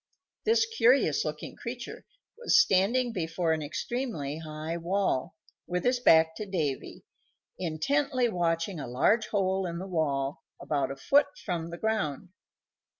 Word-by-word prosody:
This 450 +1 +4
curious 255 - +3
looking 150 0 -5
creature 240 0 -7 0.3
was 470 0 +4
standing 240 - +3
before 165 -2 0
an 160 - -2
extremely 155 - -3
high 155 +1 -5
wall, 170 -3 -1 0.3
with 180 0 -2
his 250 0 +2
back 160 -7 +5
to 215 - -4
Davy, 155 -8 -3 0.5
intently 255 - +1
watching 170 -2 -1
a 135 - -5
large 210 - +2
hole 190 -2 0
in 170 0 -4
the 185 - -5
wall 145 -6 -1 0.2
about 140 -3 -1
a 135 - -5
foot 280 - +3 0.2
from 170 -2 -2
the 170 - -7
ground. 195 -6 -2
175 Hz, 140 wpm, -29 LUFS, 155-235 Hz, 0.5 s, back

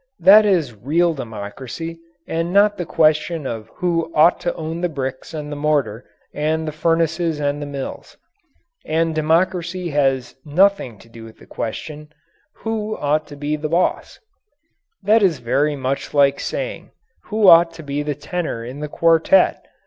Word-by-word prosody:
That 205 +5 +7
is 165 - +1
real 160 +11 +1
democracy 130 +7 -7 0.3
and 165 +1 -2
not 205 +2 +4
the 175 -4 -5
question 155 0 +1
of 115 -3 -5
who 165 -2 -1
ought 160 +3 +5
to 175 - -2
own 160 +1 -5
the 180 - 0
bricks 135 -3 -5
and 150 -2 -6
the - - -4
mortar 145 -7 -1 0.3
and 160 +1 -1
the - - -2
furnaces 165 0 0
and 145 0 -1
the 145 - -5
mills. 140 -2 -7 0.7
And 165 +1 0
democracy 170 +2 0
has 135 -3 0
nothing 165 - +2
to 105 - -18
do 115 0 -13
with 110 -1 -13
the - - -17
question, 150 +6 -6 0.6
"Who 215 -1 -2
ought 150 +1 0
to 145 - -10
be 145 +1 -2
boss?" 160 +4 -1 0.9
That 220 +2 +4
is 180 -6 +3
very 135 +5 0
much 135 +2 -3
like 140 -1 +4
asking: - - -5 0.4
"Who 215 -1 +1
ought 170 -1 +7
to 160 - -10
be 145 0 -3
the 150 -1 -3
tenor 150 -6 -4
in 130 +4 -8
the 150 - -4
quartet?" 165 - +3
155 Hz, 160 wpm, -20 LUFS, 140-170 Hz, 0.9 s, That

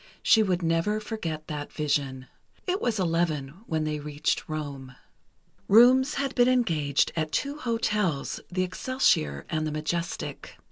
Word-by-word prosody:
She 220 - +6
would 185 -4 0
never 165 +6 +1
forget 170 -8 -5
that 150 -1 -5
vision. 140 -4 -1 0.4
It 375 +2 -1
was 230 -3 0
eleven 165 -4 -1
when 160 -1 -1
they 155 -1 -2
reached 150 +1 -2
Rome. 140 -4 -5 0.7
Rooms 255 +6 +6
had 275 -1 -1
been 245 -1 +4
engaged 160 - +2
at 155 -2 -1
two 280 - -1
hotels, 210 - -1
the 185 +1 0
Excelsior 180 - +1
and 155 0 -1
the - - -3
Majestic. 170 +3 -4
165 Hz, 140 wpm, -27 LUFS, 150-220 Hz, 0.7 s, She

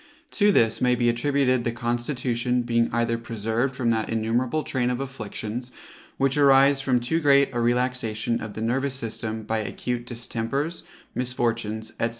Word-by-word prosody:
To 205 -1 +4
this 115 - +2
may 125 0 +4
be 120 -1 +2
attributed 130 +1 +1
the 120 - 0
constitution 120 +1 -1
being 115 0 +1
either 115 0 0
preserved 115 +3 -2
from 120 -2 +1
that 110 -1 -1
innumerable 120 +7 0
train 125 -2 -1
of 125 0 -1
afflictions, 120 -2 -5 0.5
which 135 +1 +1
arise 140 0 +6
from 130 -2 +2
too 125 +7 0
great 140 -2 +4
a 120 - -1
relaxation 120 -2 0
of 110 -1 -7
the 110 - -3
nervous 135 +4 0
system 110 -2 -4
by 110 +1 -1
acute 120 +2 -4
distempers, 125 +6 -3 0.3
misfortunes, 115 -3 -2
&c. 115 - +2
120 Hz, 155 wpm, -25 LUFS, 115-130 Hz, 0.5 s, arise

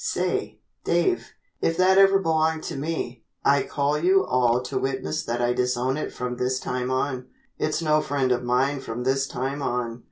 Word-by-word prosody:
Say, - - -2 0.2
Dave, 370 -2 +1 0.3
if 165 - +1
that 190 +1 +5
ever 195 0 +6
belonged 160 -3 +1
to - - -5
me, 140 -5 -4 0.2
I 140 0 +5
call 145 +1 0
you 190 +3 +4
all 125 -3 +2
to - - -2
witness 135 +4 -2
that 120 -2 -2
I 120 0 +2
disown 125 +1 0
it 155 - -3
from 125 0 -4
this 130 +1 0
time 125 0 -3
on. 130 -1 -1 0.3
It's 155 +2 -1
no 155 -1 +3
friend 140 -3 0
of 125 0 +2
mine 130 +3 +1
from 125 -2 -5
this 135 +1 +1
time 135 +3 -3
on." 120 -3 -2
135 Hz, 185 wpm, -25 LUFS, 125-155 Hz, 0.3 s, ever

